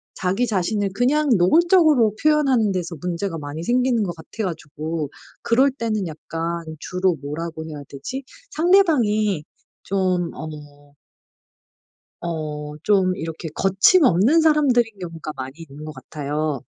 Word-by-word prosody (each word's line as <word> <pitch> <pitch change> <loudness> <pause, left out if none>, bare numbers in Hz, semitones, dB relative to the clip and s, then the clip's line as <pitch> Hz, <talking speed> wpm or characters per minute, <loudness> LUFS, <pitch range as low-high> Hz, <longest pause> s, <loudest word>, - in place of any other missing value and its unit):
자기 195 +7 0
자신을 205 -1 0
그냥 285 +7 +2
노골적으로 305 - +4
표현하는 275 -9 +3
데서 175 -2 -3
문제가 180 0 -3
많이 150 +2 -6
생기는 245 +2 +2
것 175 -4 -2
같아 210 +7 -6
가지고 155 -3 -4 0.3
그럴 260 +4 +4
때는 225 -7 -2
약간 165 +2 -4 0.2
주로 180 +1 0
뭐라고 160 +3 -5
해야 150 -2 -7
되지? 255 - -6 0.3
상대방이 245 - +3 0.4
좀 185 -3 0
어 145 -2 -10 1.3
어 150 -3 -4
좀 190 -2 +3
이렇게 160 +1 -5
거침없는 210 - +4
사람들인 255 -9 +3
경우가 165 -4 -6
많이 130 0 -6
있는 150 -2 -10
것 155 - -6
같아요. 150 -2 -3
185 Hz, 275 characters per minute, -22 LUFS, 160-240 Hz, 1.3 s, 노골적으로